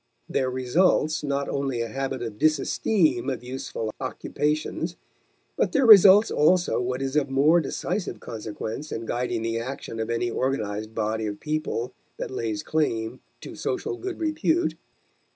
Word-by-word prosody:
There 130 Hz, -1 st, 0 dB
results 150 Hz, +5 st, +2 dB
not 140 Hz, -1 st, -1 dB
only 135 Hz, -4 st, -1 dB
a 115 Hz, -, -2 dB
habit 135 Hz, +2 st, -3 dB
of 110 Hz, -3 st, -6 dB
disesteem 155 Hz, -, +2 dB
of 130 Hz, -2 st, -4 dB
useful 125 Hz, -3 st, -5 dB
occupations, 155 Hz, +3 st, -2 dB, 0.6 s
but -, -, 0 dB
there 275 Hz, -, +3 dB
results 205 Hz, -1 st, +9 dB
also 175 Hz, -1 st, +3 dB
what 125 Hz, +2 st, -2 dB
is 135 Hz, +1 st, -3 dB
of 145 Hz, -2 st, +2 dB
more 145 Hz, +6 st, +4 dB
decisive 180 Hz, +4 st, -3 dB
consequence 110 Hz, +5 st, -6 dB
in 115 Hz, -, -4 dB
guiding 120 Hz, -1 st, -2 dB
the 115 Hz, 0 st, -1 dB
action 120 Hz, -2 st, -6 dB
of 110 Hz, -, -2 dB
any 115 Hz, 0 st, 0 dB
organized 110 Hz, -5 st, -2 dB
body 110 Hz, 0 st, -1 dB
of 105 Hz, -1 st, -5 dB
people 150 Hz, -5 st, -2 dB, 0.2 s
that -, -, -5 dB
lays 110 Hz, -5 st, -3 dB
claim 115 Hz, -8 st, -1 dB, 0.2 s
to -, -, -8 dB
social 430 Hz, -3 st, -3 dB
good 370 Hz, 0 st, -6 dB
repute. 325 Hz, +1 st, +1 dB
135 Hz, 150 wpm, -25 LUFS, 115-155 Hz, 0.6 s, results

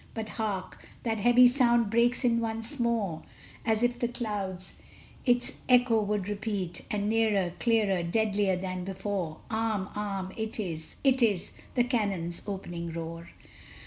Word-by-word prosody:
But 220 Hz, -1 st, -4 dB
hark! 205 Hz, -4 st, -4 dB, 0.2 s
that 225 Hz, -2 st, -1 dB
heavy 245 Hz, +3 st, +6 dB
sound 240 Hz, -4 st, +4 dB
breaks 240 Hz, +3 st, +3 dB
in 235 Hz, -1 st, +3 dB
once 225 Hz, +4 st, -2 dB
more, 220 Hz, -9 st, 0 dB, 0.4 s
As 220 Hz, 0 st, +1 dB
if 245 Hz, 0 st, +1 dB
the 240 Hz, -, +1 dB
clouds 205 Hz, -6 st, -4 dB, 0.5 s
its 245 Hz, 0 st, +4 dB, 0.2 s
echo 245 Hz, -3 st, +5 dB
would 205 Hz, -2 st, -1 dB
repeat, 200 Hz, -4 st, -3 dB
And 205 Hz, -1 st, -1 dB
nearer, 210 Hz, -5 st, +2 dB
clearer, 215 Hz, -6 st, +2 dB
deadlier 200 Hz, +1 st, +1 dB
than 185 Hz, 0 st, -4 dB
before! 190 Hz, -4 st, -3 dB
Arm! 220 Hz, -3 st, -1 dB
arm! 195 Hz, -2 st, -3 dB
it 220 Hz, 0 st, -4 dB
is 165 Hz, -6 st, -4 dB
it 265 Hz, -2 st, +3 dB
is 205 Hz, -6 st, +2 dB, 0.2 s
the 245 Hz, -, +4 dB
cannon's 200 Hz, -9 st, -1 dB
opening 175 Hz, -4 st, -4 dB
roar! 165 Hz, 0 st, -6 dB
210 Hz, 145 wpm, -29 LUFS, 190-230 Hz, 0.5 s, heavy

